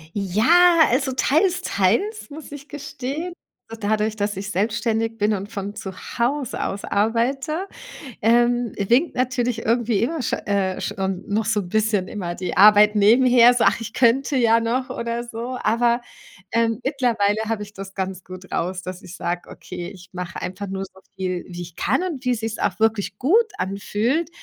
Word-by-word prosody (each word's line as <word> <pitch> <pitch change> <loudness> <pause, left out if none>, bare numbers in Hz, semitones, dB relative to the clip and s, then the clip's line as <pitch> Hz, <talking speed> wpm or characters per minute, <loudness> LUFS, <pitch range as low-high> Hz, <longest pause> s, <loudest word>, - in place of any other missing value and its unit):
Ja, 315 - +4
also, 265 +1 +1
teils 350 +8 +2
teils 235 - 0
muss 300 +1 -10
ich 285 0 -9
gestehen. 290 +4 -5 0.4
So 225 - -7
dadurch, 215 +1 0
dass 205 -2 -2
ich 200 +1 -4
selbstständig 225 +2 -1
bin 210 0 +2
und 200 0 -4
von 200 -1 -5
zu 190 - -6 0.3
Hause 255 +2 0
aus 200 - -4
arbeite, 255 - 0 0.6
ähm, 240 +1 +3
winkt 240 - +2
natürlich 245 -2 -1
irgendwie 230 -2 +1
immer 315 +5 -1
scho 245 - 0
äh, 195 -2 0
schon 190 -1 -3
noch 210 +2 0
so 215 -2 +1
'n 175 - -9
bisschen 215 -2 +1
immer 175 -4 -4
die 180 +1 -4
Arbeit 210 +1 +7
nebenher. 240 +3 +6
So: 245 - +2
„Ach, - - +3
ich 230 0 -7
könnte 265 +3 +2
ja 230 -2 +4
noch“ 250 +3 -1
oder 235 -1 -3
so. 240 +2 -5
Aber, 235 +2 +2 0.5
ähm, 230 -1 +1
mittlerweile 235 -7 +1
habe 220 -2 -2
ich 210 0 -12
das 195 -1 -9
ganz 190 -1 -4
gut 185 0 -11
raus, 180 +2 -2
dass 185 0 -7
ich 180 - -10
sage: 175 0 -4
„Okay, 180 -1 -8
ich 185 -3 -14
mache 180 -1 -6
einfach 185 +2 -5
nur 195 0 -4
so 190 0 -18 0.2
viel, 185 -2 -3
wie 175 -1 -7
ich 170 -1 -12
kann - - 0
und 320 -9 -4
wie 250 - +1
es 230 - -1
sich 225 0 -4
auch 195 +2 -1
wirklich 220 -3 0
gut 425 - +3
anfühlt.“ 210 - -1
225 Hz, 180 wpm, -22 LUFS, 195-250 Hz, 0.6 s, Arbeit